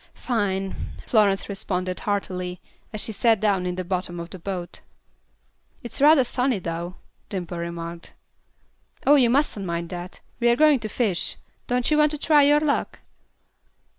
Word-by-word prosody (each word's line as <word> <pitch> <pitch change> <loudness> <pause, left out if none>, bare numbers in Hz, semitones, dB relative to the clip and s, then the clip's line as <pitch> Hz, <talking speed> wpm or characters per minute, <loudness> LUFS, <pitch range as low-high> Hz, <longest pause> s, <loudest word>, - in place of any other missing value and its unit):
"Fine," 195 -5 -2
Florence 205 -4 +3
responded, 185 -2 -3
heartily, 180 -3 -3 0.3
as 215 - -2
she - - 0
sat 225 +1 +3
down 195 -3 +1
in 180 - -2
the 185 - -3
bottom 180 -1 -3
of 170 0 -7
the 185 - -8
boat. 180 -1 -5 1.0
"It's 240 +3 -4
rather 295 -1 +7
sunny, 250 0 0
though," 170 0 -5 0.3
Dimple 175 -3 -4
remarked. 170 0 -6 0.9
"Oh, 285 - +7
you 260 -5 +5
mustn't 255 -5 +1
mind 170 0 -3
that. 175 0 -7 0.2
We're 240 -1 +4
going 300 0 +5
to 215 - -5
fish. 210 -5 -1 0.3
Don't 250 +3 0
you 305 - +4
want 300 0 +5
to 300 - -2
try 300 0 +4
your 290 +1 +5
luck?" 300 -2 -1
200 Hz, 155 wpm, -24 LUFS, 180-250 Hz, 1.0 s, rather